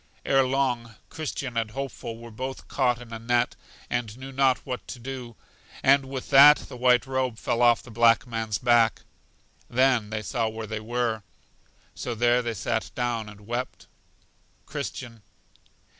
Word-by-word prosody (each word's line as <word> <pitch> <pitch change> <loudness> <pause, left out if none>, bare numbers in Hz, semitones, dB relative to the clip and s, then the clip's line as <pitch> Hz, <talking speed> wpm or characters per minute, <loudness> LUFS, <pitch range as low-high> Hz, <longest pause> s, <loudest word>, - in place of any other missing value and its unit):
Ere 135 0 +4
long, 125 -4 -1
Christian 140 -5 -5
and 115 -1 0
Hopeful 125 -2 -6
were 115 0 -11
both 130 +4 -6
caught 125 -3 +1
in 120 -1 -11
a 115 - -5
net, 120 +1 +1 0.3
and 120 -2 -3
knew 135 +1 -8
not 135 -1 +3
what 125 -2 -5
to - - -7
do; 125 -1 -7 0.5
and 135 0 +5
with 130 0 -6
that 145 +2 +9
the - - -10
white 125 0 +4
robe 130 -3 -1
fell 120 0 -1
off 120 -1 +5
the 120 - -12
black 115 +1 +4
man's 115 -3 -2
back. 120 -1 +3 0.7
Then 125 -4 +2
they 110 0 -3
saw 115 +1 -1
where 110 0 -6
they 110 0 -4
were. 115 0 -1 0.7
So 120 - -4
there 120 +2 +3
they 120 -2 -3
sat 110 +2 -2
down 120 -3 -2
and 105 0 -13
wept. 120 +4 -5 0.8
Christian. 115 -4 -6
120 Hz, 160 wpm, -26 LUFS, 115-130 Hz, 0.8 s, that